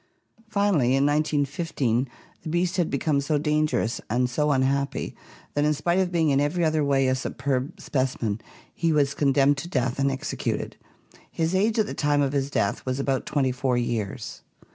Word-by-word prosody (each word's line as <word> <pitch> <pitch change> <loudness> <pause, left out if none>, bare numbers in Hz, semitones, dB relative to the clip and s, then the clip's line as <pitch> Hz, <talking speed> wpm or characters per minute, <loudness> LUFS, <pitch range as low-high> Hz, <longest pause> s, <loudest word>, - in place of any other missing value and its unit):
Finally 195 - +2
in 135 +1 +3
1915 145 -4 0 0.3
the - - -6
beast 175 +3 0
had 175 -3 +1
become 140 0 +1
so 150 +2 0
dangerous 150 -5 0
and 125 +2 +1
so 150 +4 +1
unhappy 140 +1 0 0.4
that 145 - +1
in 150 0 +2
spite 170 +5 +1
of 185 -2 +1
being 165 -4 +2
in 140 0 +3
every 165 +4 +1
other 155 -1 +2
way 135 -2 +2
a 130 - +3
superb 130 +2 -2
specimen 125 -6 -1 0.3
he 165 -1 0
was 145 -2 +2
con 140 -1 +2
demned 140 +1 +4
to 160 - -5
death 130 -4 -1
and 140 0 +3
executed. 135 -1 -3 0.5
His 165 +1 -1
age 215 +4 +2
at 215 - +3
the - - -5
time 145 -1 +2
of 140 0 -1
his 140 -1 0
death 100 -7 -1
was 130 +1 -2
about 135 -1 -1
twenty 135 -3 +1
four 125 0 0
years. 115 -2 -3
140 Hz, 185 wpm, -25 LUFS, 130-155 Hz, 0.5 s, demned